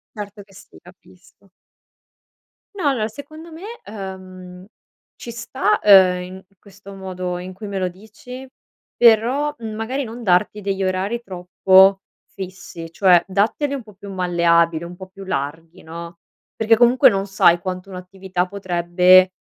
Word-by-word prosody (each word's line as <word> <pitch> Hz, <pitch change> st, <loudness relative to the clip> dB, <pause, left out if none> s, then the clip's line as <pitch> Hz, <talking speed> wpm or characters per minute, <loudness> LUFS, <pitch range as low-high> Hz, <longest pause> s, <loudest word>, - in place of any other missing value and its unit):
Certo 205 Hz, -1 st, -8 dB
che 195 Hz, -1 st, -22 dB
sì, 195 Hz, -, -16 dB
capisco. 180 Hz, +2 st, -21 dB, 1.2 s
No, 365 Hz, -7 st, -3 dB
allora, 225 Hz, -6 st, 0 dB
secondo 310 Hz, +7 st, -11 dB
me, 325 Hz, +3 st, -11 dB, 0.2 s
uhm, 185 Hz, -3 st, -9 dB, 0.5 s
ci 240 Hz, -, -9 dB
sta, 240 Hz, +3 st, -1 dB
uhm, 185 Hz, -3 st, +6 dB
in 185 Hz, +1 st, -10 dB, 0.2 s
questo 200 Hz, 0 st, -14 dB
modo 185 Hz, -2 st, -5 dB
in 180 Hz, +1 st, -8 dB
cui 195 Hz, +3 st, -9 dB
me 200 Hz, -1 st, -4 dB
lo 185 Hz, -, 0 dB
dici, 220 Hz, +7 st, -12 dB, 0.5 s
però 240 Hz, +6 st, +4 dB
magari 225 Hz, +5 st, -4 dB
non 235 Hz, +1 st, -9 dB
darti 185 Hz, +2 st, +1 dB
degli 195 Hz, -1 st, -3 dB
orari 190 Hz, +5 st, -2 dB
troppo 190 Hz, 0 st, +3 dB, 0.3 s
fissi, 185 Hz, -3 st, -9 dB
cioè 180 Hz, -1 st, +4 dB
datteli 215 Hz, +9 st, 0 dB
un 270 Hz, -, -5 dB
po' 215 Hz, -2 st, -17 dB
più 195 Hz, 0 st, -10 dB
malleabili, 170 Hz, -2 st, +2 dB
un 175 Hz, -, -9 dB
po' 185 Hz, +1 st, -11 dB
più 195 Hz, +1 st, -12 dB
larghi, 165 Hz, +2 st, -5 dB
no, 170 Hz, +1 st, -9 dB, 0.4 s
perché 225 Hz, +1 st, +3 dB
comunque 240 Hz, +2 st, +5 dB
non 195 Hz, 0 st, -2 dB
sai 175 Hz, -3 st, +4 dB
quanto 185 Hz, +1 st, -6 dB
un'attività 185 Hz, 0 st, -4 dB
potrebbe 185 Hz, -1 st, +3 dB
190 Hz, 140 wpm, -20 LUFS, 180-215 Hz, 1.2 s, uhm